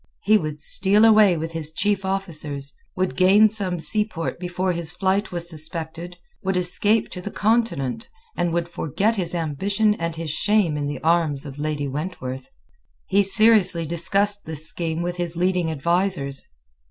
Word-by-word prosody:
He 215 +2 +4
would 155 -3 -5
steal 200 +7 +5
away 215 -5 +5
with 160 +1 -4
his 160 -2 -4
chief 200 +3 0
officers, 155 -8 -2 0.2
would 185 0 -1
gain 200 +4 +5
some 195 -5 -3
seaport 210 -3 -2
before 180 +1 -2
his 170 -1 -1
flight 195 +2 0
was 175 -1 -4
suspected, 165 +2 -5 0.2
would 190 -1 -1
escape 205 +5 +1
to 180 - -7
the 205 - -5
Continent, 220 - -1 0.3
and 175 - -1
would 170 0 -1
forget 180 - -1
his 175 -2 -2
ambition 195 +7 0
and 165 -4 -4
his 165 -2 -4
shame 205 -2 +1
in 145 -1 -2
the 145 -2 -6
arms 160 -4 +1
of 140 0 -9
Lady 150 -1 -2
Wentworth. 135 -3 -6 0.6
He 200 - +3
seriously 195 -4 +3
discussed 200 +5 +1
this 155 -1 -2
scheme 165 0 -2
with 175 0 -4
his 175 -1 -1
leading 180 -1 +1
advisers. 160 -2 0
175 Hz, 160 wpm, -22 LUFS, 160-195 Hz, 0.6 s, steal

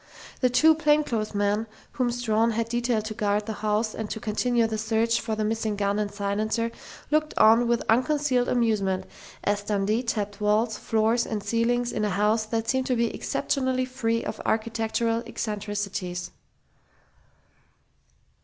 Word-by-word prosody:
The 255 - +3
two 310 +6 +5
plainclothesmen 225 -9 +1 0.2
whom 250 -2 0
Strawn 230 -1 +1
had 230 +1 -1
detailed 240 -2 0
to 215 - -4
guard 210 -1 0
the 220 - -3
house 215 +1 0
and 220 -2 -5
to 220 - -4
continue 235 +2 +1
the 220 -1 -2
search 225 +1 +1
for 225 -1 -2
the 215 - -1
missing 220 -1 -1
gun 200 0 0
and 205 -1 -2
silencer 215 +3 -1 0.4
looked 305 0 +1
on 230 +2 +6
with 235 0 +1
unconcealed 255 +1 +2
amusement 200 -6 +1 0.4
as 205 0 +1
Dundee 205 +2 0
tapped 210 -4 -3
walls, 215 +2 +2
floors 225 +2 +1
and 210 -3 -3
ceilings 240 +1 +1
in 215 - -2
a 210 - +1
house 210 +3 +1
that 225 0 -2
seemed 260 +2 0
to 255 - +1
be 235 -1 0
exceptionally 260 -2 -1
free 230 -3 -1
of - - -5
architectural 225 +1 0
eccentricities. 205 -5 -4
225 Hz, 150 wpm, -26 LUFS, 210-240 Hz, 0.4 s, on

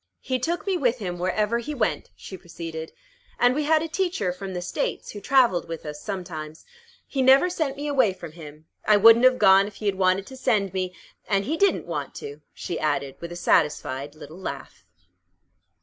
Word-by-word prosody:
"He 260 -1 -2
took 340 - -2
me 390 -2 0
with 255 -6 +1
him 180 -6 -5
wherever 210 +6 0
he 295 +5 -5
went," 220 -5 -1
she 190 - -9
proceeded. 165 -3 -8 0.5
"And 245 +1 +4
we 295 +2 -1
had 315 +1 +3
a - - -3
teacher 325 - -1
from 190 0 -7
the 180 - -3
States, 180 - -3
who 205 - -8
travelled 240 -7 +3
with 165 -1 -7
us 150 0 -7
sometimes. 165 -6 -6 0.4
He 270 - -2
never 270 +7 +5
sent 300 -6 -2
me 290 - -5
away 260 -8 +3
from 170 -3 -10
him. 155 -1 -12 0.2
I 210 - +5
wouldn't 230 +4 +7
have 255 0 +5
gone 195 -2 +6
if 205 - -11
he 215 - -8
had 200 - +2
wanted 190 +1 +1
to 265 - -11
send 210 -7 0
me 185 -1 -3 0.3
and 195 -1 +1
he 310 - -1
didn't 395 +3 +2
want - - -5
to," 435 0 -8
she 170 - -5
added, 145 -3 -1
with 170 0 -7
a - - -6
satisfied 145 -4 0
little 160 +3 -11
laugh. 140 - -8
195 Hz, 200 wpm, -25 LUFS, 170-260 Hz, 0.5 s, wouldn't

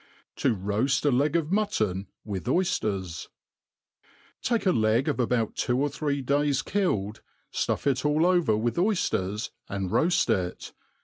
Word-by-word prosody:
To 115 - +2
roafl 105 +9 0
a 145 - +4
Leg 145 +4 +1
of 165 -1 0
Mutton 110 - 0 0.2
with 100 -4 -4
Oyjiers^ 105 - -1 1.1
Take 235 -3 0
a 185 - +5
leg 110 +1 +2
about 125 -5 0
two 125 0 0
or 145 +1 +1
three 140 -1 -2
days 140 +1 +1
killed, 110 - -1 0.3
ftuff - - -1
it 135 -2 +1
all 150 +2 +2
over 175 -10 +3
W/th 115 +5 -1
oyfters, 115 - 0 0.2
ami 95 -2 -3
roaft 170 - +2
it. 90 -5 -2
130 Hz, 140 wpm, -27 LUFS, 105-155 Hz, 1.1 s, a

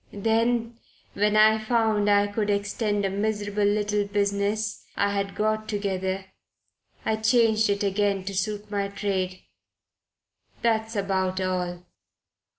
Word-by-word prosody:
Then, 230 +2 0 0.3
when 210 +1 +2
I 220 +1 +6
found 215 -2 +1
I 205 0 +5
could 205 +1 -2
extend 205 0 0
a - - +1
miserable 205 0 -1
little 210 0 +1
business 200 +1 -1
I 200 0 +2
had 200 -1 -2
got 215 0 -1
together, 190 -2 -2 0.8
I 220 0 +1
changed 220 -1 +3
it 200 0 0
again 200 -1 +1
to 200 +1 -5
suit 205 +2 -3
my 200 -1 0
trade. 195 -2 -3 1.2
That's 225 -1 +1
about 190 -2 0
all." 180 -1 -2
205 Hz, 125 wpm, -25 LUFS, 200-215 Hz, 1.2 s, I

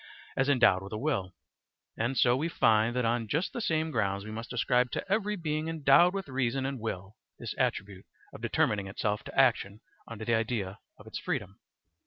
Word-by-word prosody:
as 135 +2 +1
endowed 120 -9 +4
with 95 - -9
a 110 - -3
will; 110 - -2 0.6
and 120 +4 -1
so 120 0 +5
we 155 +6 -1
find 115 -4 +3
that 125 -1 +1
on 115 0 0
just 150 - -1
the 240 - -3
same 160 -5 0
grounds 100 -5 -1
we 110 - -7
must 115 +2 -6
ascribe 125 -1 +2
to - - -4
every 210 0 +1
being 155 -3 -2
endowed 165 +2 +5
with 195 -2 -4
reason 130 0 -1
and 135 -1 -3
will 105 -2 -5 0.2
this - - -5
attribute 100 -2 -2 0.3
of - - -10
determining 100 -2 +1
itself 105 +2 -2
to - - -3
action 110 -6 +3 0.3
under 110 -1 -7
the 120 - +1
idea 115 -4 -1 0.2
of - - -15
its - - -6
freedom. 100 +2 -4
120 Hz, 195 wpm, -29 LUFS, 105-140 Hz, 0.6 s, so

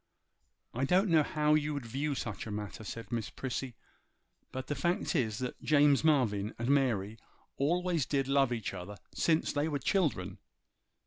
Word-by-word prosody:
'I 130 +3 0
don't 185 +7 +3
know 160 -2 +6
how 150 0 +1
you 150 -1 +1
would 140 -4 -4
view 140 +5 -2
such 115 -3 -4
a - - -5
matter,' 105 0 -5
said 115 0 -7
Miss 115 -4 -2
Prissy; 130 -1 -4 0.8
'but 130 0 -5
the 145 - -2
fact 170 +6 0
is, 110 -7 +1
that 125 0 -5
James 145 -2 +4
Marvyn 115 -10 +2
and 120 +2 -2
Mary 115 -7 +1 0.4
always 170 +1 +1
did 135 -2 0
love 135 -2 +3
each 115 -5 -3
other 95 +2 -7
ever 100 - -15
since 160 -1 +1
they 145 +1 +1
were 150 -3 -1
children. 130 - 0
135 Hz, 175 wpm, -32 LUFS, 115-150 Hz, 0.8 s, know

